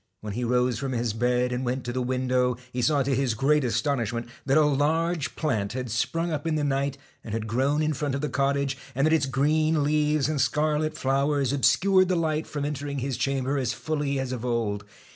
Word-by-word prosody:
When 105 -1 -5
he 120 +4 -3
rose 125 -1 +1
from 135 0 -3
his 120 -2 -1
bed, 125 +2 +1
and 125 +1 -2
went 125 +1 -2
to 120 - -4
the 130 - -1
window, 125 -1 0 0.2
he 125 - -1
saw 140 +3 +3
to 135 +1 0
his 130 -3 +1
great 145 +5 +2
astonishment 120 -1 -1 0.2
that 135 +2 +4
a 155 - +5
large 155 +3 0
plant 110 -10 -1
had 125 -2 -4
sprung 165 +9 -1
up 155 0 -3
in 160 - +1
the 150 - 0
night 140 0 0 0.3
and 110 - -4
had 110 -1 -3
grown 135 +7 +1
in 155 0 +1
front 145 -1 -2
of 140 - -3
the 150 - -1
cottage, 140 -1 0 0.2
and 135 +2 +2
that 155 - +3
its 150 -4 +2
green 155 +3 +2
leaves 150 -1 +2
and 150 -3 0
scarlet 155 +2 0
flowers 140 -1 +1
obscured 185 +7 +4
the 185 - +1
light 160 -2 0
from 145 -1 -3
entering 145 -1 -3
his 135 0 -2
chamber 135 +1 0
as 125 -1 -1
fully 145 -3 -2
as 130 -1 -3
of 125 -2 -4
old. 110 -4 -1
135 Hz, 220 wpm, -26 LUFS, 125-150 Hz, 0.3 s, a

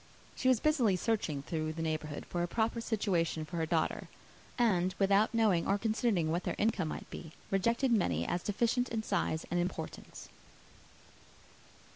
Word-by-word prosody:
She 255 - -1
was 255 -3 +5
busily 255 -10 +3
searching 180 -8 -1
through 155 0 -2
the 165 +1 -4
neighbourhood 155 -2 -3
for 175 - -3
a 175 - 0
proper 225 +5 0
situation 180 -8 0
for 170 +2 -6
her 160 -1 0
daughter; 165 -1 0 0.5
and, 185 -6 +2
without 200 +2 +3
knowing 215 -7 +2
or 200 - +3
considering 215 -6 +1
what 175 +2 -1
their - - -2
income 205 -6 +1
might - - -6
be, 160 -2 -8 0.2
rejected 235 +7 +2
many 85 - +2
as 175 - -1
deficient 235 +5 0
in 225 -1 -2
size 170 -6 -1
and 175 - +1
importance. 175 +2 -5
190 Hz, 160 wpm, -32 LUFS, 165-225 Hz, 0.5 s, was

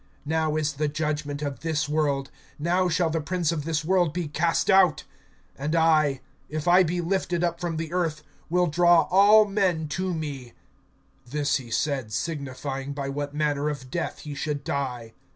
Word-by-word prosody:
(31)Now 155 0 +1
is 155 0 -1
the 150 +2 -1
judgment 150 -1 -3
of 140 -2 -4
this 155 -1 -1
world; 145 -3 0 0.3
now 175 +4 +1
shall 165 0 +1
the 165 0 -1
prince 170 +1 -1
of 150 -3 -3
this 155 -2 -1
world 175 -3 +2
be 175 -3 -2
cast 165 +3 0
out. 190 -5 +4 0.6
(32)And 150 +4 -1
I, 155 -4 +3 0.3
if 155 +2 -4
I 180 +2 +7
be 175 0 0
lifted 175 -1 -1
up 170 -1 -1
from 170 -2 -2
the 165 +1 -4
earth, 165 -4 -1 0.3
will 180 +2 +3
draw 175 +1 +4
all 205 +3 +7
men 190 -6 0
to 185 +5 -2
me. 140 -6 -6 0.8
(33)This 145 +1 +1
he 125 -4 -10
said, 130 -1 -1
signifying 140 0 -4
by 140 -1 -4
what 145 +1 -4
manner 150 -1 0
of 135 -4 -6
death 175 - -3
he 150 - -7
should 145 0 -3
die. 125 -6 -3
155 Hz, 175 wpm, -26 LUFS, 145-170 Hz, 0.8 s, I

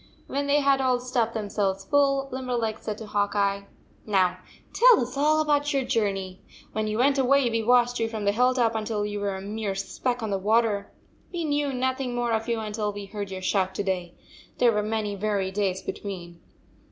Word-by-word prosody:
When 280 +1 -2
they 290 +1 +3
had 275 -1 +3
all 255 -1 +2
stuffed 245 -2 -1
themselves 200 -2 -1
full, 275 +2 +2
Limberleg 245 -4 -2
said 210 -1 -5
to 220 - -8
Hawk 205 0 -1
Eye: 200 -1 0 0.4
"Now 185 -3 +1 0.3
tell - - +7
us 245 +2 -3
all 305 +2 +3
about 295 -1 +1
your 275 -1 +1
journey. 195 -5 -1 0.3
When 215 0 -2
you 215 0 -2
went 275 +3 +3
away, 270 0 +4
we 225 0 +1
watched 245 +1 +3
you 225 0 0
from 220 -2 -4
the 200 - +4
hill 250 +4 +3
top 235 -3 +2
until 215 -1 -2
you 205 0 -3
were 200 -1 -2
a 190 - -6
mere 205 0 -3
speck 240 +5 -2
on 215 - -2
the 195 - 0
water. 210 0 +1 0.4
We 350 -2 -3
knew 290 -2 0
nothing 260 -1 -1
more 240 -1 0
of 225 0 0
you 230 -1 0
until 210 -1 -2
we 205 0 -7
heard 200 0 -6
your 190 -1 -6
shout 190 -1 0
to - - -1
day. 180 -3 -3 0.4
There 240 -1 +5
were 210 -1 +1
many 210 -1 -2
weary 200 -1 -1
days 190 -1 -1
between." 175 -4 -6
220 Hz, 205 wpm, -26 LUFS, 200-255 Hz, 0.4 s, tell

